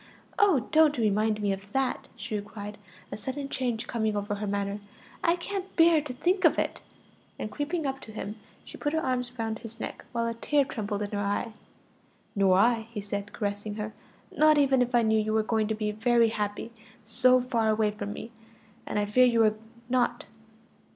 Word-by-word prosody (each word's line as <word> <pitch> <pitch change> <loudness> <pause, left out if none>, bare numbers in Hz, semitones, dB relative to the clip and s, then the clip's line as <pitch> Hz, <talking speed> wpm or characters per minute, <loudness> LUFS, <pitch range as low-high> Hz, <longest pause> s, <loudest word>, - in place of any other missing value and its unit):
"Oh, 375 - +4
don't 310 -2 +5
remind 215 -1 +1
me 200 - +2
of 195 +1 -9
that!" 270 -1 0
she 215 -2 -4
cried, 205 0 -8 0.3
a - - -3
sudden 275 +5 -4
change 240 -5 -2
coming 220 -2 -1
over 205 +1 -2
her 205 0 -3
manner. 200 0 -2 0.4
"I 335 0 +4
can't 385 +2 -5
bear 330 -2 +6
to 295 -3 -5
think 355 +10 0
of - - +5
it!" - - -1 0.6
and 215 - -5
creeping 310 +2 -2
up 270 0 -2
to 220 - -11
him, 215 0 -6 0.3
she - - -10
put 295 0 -1
her 320 - +2
arms 250 -5 -1
around 225 -1 -2
his 230 0 -11
neck, - - -6
while 235 -1 -1
a 230 - -1
tear 280 +5 +1
trembled 210 -7 -3
in 205 - -5
her 205 - -2
eye. 205 +3 -1 0.8
"Nor 195 -2 +4
I," 225 +1 +3
he 230 -2 -5
said, 205 0 -4
caressing 205 0 -3
her; 215 0 -4 0.4
"not 310 0 +5
even 270 -3 +4
if 250 0 +1
I 235 - +5
knew 220 0 +3
you 215 0 -1
were 220 0 +3
going 220 -1 +1
to 220 - -1
be 210 -1 -1
very 230 +2 +3
happy 210 +1 -3 0.3
so 255 +4 +4
far 235 -3 0
away 215 -1 +2
from 205 -1 -5
me; 230 - -7 0.6
and - - -2
I 205 - +2
fear 250 +5 +5
you 230 -2 +4
are 215 -1 +4 0.3
not. 250 -1 +1
225 Hz, 200 wpm, -28 LUFS, 210-255 Hz, 0.8 s, bear